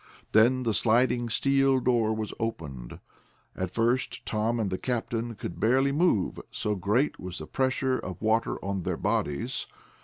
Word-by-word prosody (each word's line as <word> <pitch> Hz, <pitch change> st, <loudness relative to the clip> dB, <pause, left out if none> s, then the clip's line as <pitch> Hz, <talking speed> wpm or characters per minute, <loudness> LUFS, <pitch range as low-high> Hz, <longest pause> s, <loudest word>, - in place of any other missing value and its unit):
Then 125 Hz, +4 st, +4 dB
the 115 Hz, -2 st, +1 dB
sliding 120 Hz, +2 st, +2 dB
steel 135 Hz, +2 st, +3 dB
door 120 Hz, -4 st, +2 dB
was 110 Hz, -1 st, -3 dB
opened. 70 Hz, -, -5 dB, 0.6 s
At 95 Hz, -1 st, -2 dB
first 120 Hz, +6 st, 0 dB
Tom 115 Hz, +2 st, 0 dB
and 105 Hz, -4 st, -1 dB
the 95 Hz, -, -2 dB
captain 120 Hz, -1 st, -2 dB
could 85 Hz, -, -6 dB
barely 130 Hz, +5 st, +3 dB
move, 145 Hz, -, +1 dB
so 105 Hz, -, -2 dB
great 105 Hz, +9 st, 0 dB
was 90 Hz, -1 st, -6 dB
the 75 Hz, -, -6 dB
pressure 130 Hz, +4 st, 0 dB
of 95 Hz, -2 st, -6 dB
water 110 Hz, +1 st, +1 dB
on 100 Hz, -1 st, -2 dB
their -, -, -2 dB
bodies. 120 Hz, -, -1 dB
115 Hz, 155 wpm, -28 LUFS, 100-130 Hz, 0.6 s, Then